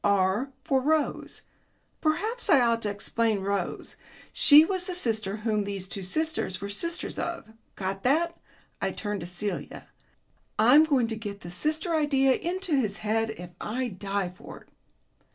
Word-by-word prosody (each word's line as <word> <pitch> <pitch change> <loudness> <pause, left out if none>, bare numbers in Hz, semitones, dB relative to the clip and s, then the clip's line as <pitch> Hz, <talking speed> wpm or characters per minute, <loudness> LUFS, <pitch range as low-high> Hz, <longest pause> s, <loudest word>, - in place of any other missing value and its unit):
R 200 +6 +2
for 275 -4 +2
Rose. 305 +2 0 0.6
Perhaps 430 +9 -1
I 325 - +7
ought 230 -2 +2
to 210 - -1
explain 210 +1 0
Rose. 195 -2 -3 0.4
She 300 +2 +8
was 370 0 -2
the 365 - -2
sister 220 - -1
whom 215 -1 0
these 200 -2 -5
two 195 +1 -5
sisters 310 - -1
were 200 0 -5
sisters 335 +12 -3
of. 335 -10 -4 0.2
Got 195 0 -3
that?" 330 +8 +2 0.5
I - - -1
turned 205 -1 -3
to 170 - -6
Celia. 190 +4 -4 0.7
"I'm 250 +9 +7
going 275 -6 +2
to 225 0 -3
get 205 -2 -7
the 175 - -8
sister 310 - -1
idea 275 -4 +3
into 360 +2 -2
his 215 -6 0
head 225 +1 +1
if 180 -5 -8
I 250 +3 -2
die 195 -1 -3
for 180 - -12
it." - - -23
225 Hz, 160 wpm, -27 LUFS, 200-310 Hz, 0.7 s, She